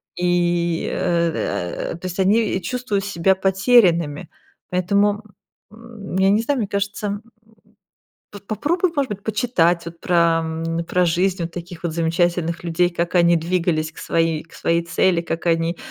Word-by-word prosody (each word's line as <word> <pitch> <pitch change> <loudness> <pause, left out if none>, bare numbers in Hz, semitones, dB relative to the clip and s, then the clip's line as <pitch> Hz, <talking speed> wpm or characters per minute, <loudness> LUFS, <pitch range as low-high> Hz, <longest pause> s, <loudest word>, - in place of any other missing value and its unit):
и, 175 -1 0
э 165 - -1
э, - - -6
то 180 - -11
есть 180 +1 -6
они 200 0 +2
чувствуют 245 -5 -2
себя 190 -1 +2
потерянными. 190 - +3 0.4
Поэтому, 200 +4 +1 0.5
м, 220 -4 -8
я 190 0 +4
не 210 +3 +3
знаю, 280 +1 0
мне 210 - -1
кажется, 200 +1 -2
м. 205 0 -3 1.1
П 205 - -8
попробуй, 330 - 0
может 280 -3 0
быть, 200 0 -6
почитать 180 -7 +1
вот 170 0 -9
про, 180 - -1 0.3
м, 165 +1 -3
про 180 +1 +1
жизнь 175 0 0
таких 175 0 -9
вот 170 - -1
замечательных 170 0 0
людей, 175 +1 +1
как 170 +1 -3
они 170 0 +5
двигались 165 -1 0
к - - -27
своей 165 -2 0
к 165 - -22
своей 170 0 0
цели, 170 +1 +2
как 170 0 -4
они, 165 +1 +1
175 Hz, 155 wpm, -21 LUFS, 170-200 Hz, 1.1 s, они